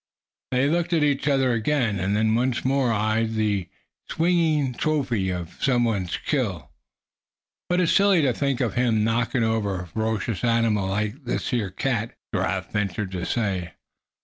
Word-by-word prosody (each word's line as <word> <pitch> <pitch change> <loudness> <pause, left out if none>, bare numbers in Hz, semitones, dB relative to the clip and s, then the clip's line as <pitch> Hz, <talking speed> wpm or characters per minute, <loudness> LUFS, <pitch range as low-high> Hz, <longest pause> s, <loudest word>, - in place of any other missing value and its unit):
They 130 +2 +2
looked 175 +3 0
at 160 -3 +3
each 145 -1 +1
other 135 -3 +3
again, 115 -3 0
and 100 +3 0
then 110 +1 +2
once 125 +2 0
more 130 -2 +2
eyed 110 +1 0
the 100 -5 0 0.4
swinging 160 -5 +1
trophy 125 -9 0
of 90 -2 -5
some 125 -3 +3
one's 100 -7 -1
skill. - - -2 1.0
"But 180 +1 +2
it's 170 - +2
silly 195 -5 +4
to 130 -3 +2
think 140 0 -1
of 115 -6 0
him 115 -4 +2
knockin' 115 +1 +1
over 105 -5 0
a - - -7
ferocious 110 +4 -2
animal 115 -4 +2
like 105 +8 -3
this 120 - -2
here 115 -6 0
cat," 115 +3 -2 0.2
Giraffe - - -1
ventured 105 -1 -2
to 90 -2 -4
say. 95 -8 -2
115 Hz, 160 wpm, -24 LUFS, 105-135 Hz, 1.0 s, silly